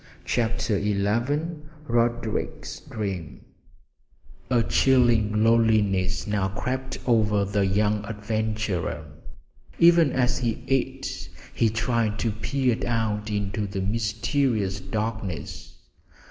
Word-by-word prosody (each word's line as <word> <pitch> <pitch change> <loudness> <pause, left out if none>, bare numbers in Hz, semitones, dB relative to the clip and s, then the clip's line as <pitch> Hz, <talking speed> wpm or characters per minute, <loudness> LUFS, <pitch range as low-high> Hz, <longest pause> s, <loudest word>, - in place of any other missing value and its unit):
CHAPTER 115 -3 0
XI 100 -1 0 0.8
RODERICK'S 120 0 -1
DREAM 95 -7 -4 1.1
A 120 -3 +3
chilling 115 -6 +3
loneliness 105 -5 +3
now 105 -2 0
crept 130 +7 -3
over 105 -4 +3
the 100 0 +1
young 105 +2 +1
adventurer. 105 -6 -2 0.7
Even 170 -3 +6
as 125 -1 +1
he 120 -1 -2
ate 135 0 -2 0.2
he 115 - +2
tried 110 -1 0
to 115 0 0
peer 125 +3 0
out 110 -2 -1
into 105 0 -2
the 100 0 -4
mysterious 110 0 0
darkness. 105 -7 -4
110 Hz, 95 wpm, -25 LUFS, 100-120 Hz, 1.1 s, Even